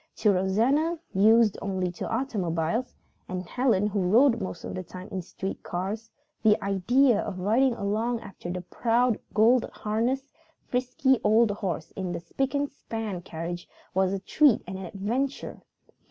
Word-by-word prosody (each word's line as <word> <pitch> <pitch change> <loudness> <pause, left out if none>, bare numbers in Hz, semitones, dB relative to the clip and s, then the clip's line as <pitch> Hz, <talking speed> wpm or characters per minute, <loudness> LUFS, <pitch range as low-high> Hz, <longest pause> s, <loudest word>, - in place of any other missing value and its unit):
To 210 - +3
Rosanna, 235 - +2 0.2
used 215 +2 +5
only 190 -3 -1
to 175 - -5
automobiles, 220 -3 -1 0.3
and 185 0 -4
Helen 230 -5 +2
who 210 -1 0
rode 230 +6 +4
most 190 - -5
of - - -5
the 185 - -3
time 185 +1 -9
in 190 - -3
street 190 +2 -6
cars, 205 +5 -4 0.3
the 215 -2 +4
idea 215 +6 +3
of 185 - -5
riding 235 +6 +3
along 225 +3 -1
after 195 -4 -9
the 180 +1 -3
proud 235 +5 +1 0.2
gold 230 +3 +4
harnessed, 245 +6 -2 0.3
frisky 255 +1 +1
old 220 +1 +4
horse 180 -6 -4
in 185 -2 -4
the - - -3
spick 270 +11 -2
and 285 0 0
span 220 -8 -5
carriage 175 +1 -6 0.2
was 190 0 +2
a 195 - -1
treat 265 +6 +3
and 190 +1 -6
an 190 - -6
adventure. 235 +10 -3
210 Hz, 155 wpm, -27 LUFS, 185-245 Hz, 0.3 s, used